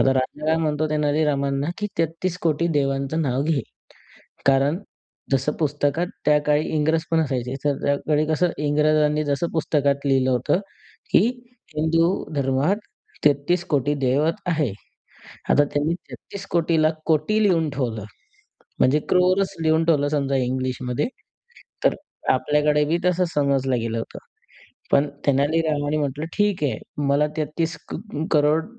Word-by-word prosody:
आता 135 - +4
राजा 130 +3 -2
काय 160 +1 +3
म्हणतो 155 -1 0
तेलारीरामांना, 145 -2 +1
की 210 - -1
33कोटी 165 0 0
देवांचं 135 +3 0
नाव 135 -1 0
घे. 155 -3 +1 0.9
कारण 140 +5 +3 0.5
जसं 135 +2 +2
पुस्तकात 150 +2 0 0.2
त्या 150 0 +5
काळी 150 0 +2
इंग्रजपण 160 +2 +1
असायचे 130 -4 -2
तर 145 -1 +1
त्या 140 - +3
काळी 155 0 +2
कसं 160 +3 +1
इंग्रजांनी 150 +1 +2
जसं 145 +3 -1
पुस्तकात 145 -3 0
लिहिलं 135 -1 +2
होतं, 125 +8 +1 0.5
की - - +6 0.6
हिंदू 165 +4 +1
धर्मात 140 +7 +1 0.5
33कोटी 145 -1 +2
देवत 140 +5 +2
आहे. 155 - +1 0.8
आता 145 - +5
त्यांनी 145 +3 -1
33कोटी 170 -3 -2
ला 155 - +4 0.2
कोटी 160 +7 +2
लिहून 165 -6 +2
ठेवलं 120 -7 -3 0.8
म्हणजे 135 +4 +4
क्रोरच 185 +2 +2
लिहून 160 +1 +3
ठेवलं 150 -4 +2
समजा 140 -2 0
इंग्लिशमध्ये 130 - -1 0.8
तर - - +3 0.4
आपल्याकडे 150 0 +2
बी 165 +3 +1
तसं 180 0 +2
समजलं 135 -3 +1
गेलं 115 0 -2
होतं. 115 - -6 0.7
पण 145 +1 +3 0.2
तेलारीरामांनी 145 +1 +1
म्हटलं, 145 +1 -2
"ठीक 205 -5 +1
आहे, 140 - 0 0.3
मला 140 +2 +3
33 160 +2 -2 0.2
क - - -3 0.4
करोड 150 +1 +3
150 Hz, 125 wpm, -23 LUFS, 140-160 Hz, 0.9 s, की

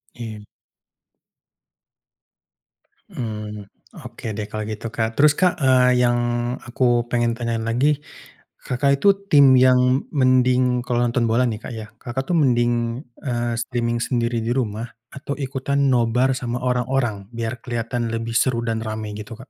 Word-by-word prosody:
Iya. 110 -3 -8 2.7
Mmm, 110 -3 -5 0.6
oke - - -10
deh 105 - -3
kalau 110 0 -4
gitu, 110 +2 -7
Kak, 110 -1 0
terus, 150 0 +5
Kak, 180 -2 +4
eee, 130 -1 +5
yang 120 0 +3 0.5
aku 125 +2 -2 0.3
pengen 120 -1 +1
tanyain 115 -1 -2
lagi, 140 +5 +1 0.6
Kakak 140 +2 +1
itu 200 - +5 0.2
tim 140 -3 +7
yang 125 0 +5 0.4
mending 125 -1 +3
kalau 120 -1 0
nonton 120 -1 0
bola 120 +3 +3
nih, 110 -3 -2
Kak, 120 - -6
ya, 110 - -7 0.2
Kakak 130 +2 -3
tuh 175 - +2
mending 120 -3 +3 0.5
eee, 120 -2 -1
streaming 120 -1 -2
sendiri 120 -1 -1
di 115 - -3
rumah 115 0 -3 0.3
atau 140 0 -5
ikutan 140 0 -2
nobar 125 +2 +2
sama 120 -2 -3
orang-orang 125 -5 -1
biar 115 0 -5
kelihatan 120 0 -3
lebih 115 0 -3
seru 120 0 +1
dan 115 -1 -1
ramai 110 -1 -5
gitu, 105 +2 -8
Kak? 130 - -14
120 Hz, 145 wpm, -22 LUFS, 115-130 Hz, 2.7 s, tim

